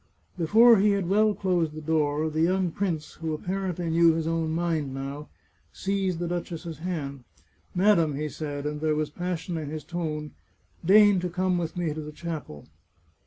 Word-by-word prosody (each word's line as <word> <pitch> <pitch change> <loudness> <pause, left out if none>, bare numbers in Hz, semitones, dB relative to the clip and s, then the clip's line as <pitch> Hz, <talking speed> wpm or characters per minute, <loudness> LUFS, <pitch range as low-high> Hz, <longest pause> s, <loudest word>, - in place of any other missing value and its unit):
Before 225 +7 +6
he 205 +1 +4
had 195 -3 -1
well 210 +2 +3
closed 175 -5 0
the 155 - -6
door 155 -1 0
the 155 +1 -1
young 180 +1 +2
prince, 170 -5 -3
who 160 -1 -1
apparently 180 0 -3
knew 165 0 +5
his 160 0 -2
own 165 -1 0
mind 160 -5 -1
now, 140 +2 -6 0.4
seized 195 -2 -1
the 175 +1 -2
duch 175 +1 -3
ess's 165 -1 -6
hand. 145 -7 -4 0.3
" - - -39
Madam," 180 -6 +3
he 150 +2 -2
said, 145 0 -5
and 150 0 -3
there 155 -1 +1
was 150 -1 -1
passion 175 0 -3
in 155 -3 -4
his 155 0 -5
tone, 155 -3 -4 0.3
" - - -41
deign 205 +2 +6
to 180 0 -2
come 180 0 0
with 165 0 -4
me 170 -4 -1
to 155 - -5
the 150 0 -7
chapel." 150 - -7
165 Hz, 190 wpm, -27 LUFS, 155-180 Hz, 0.4 s, Before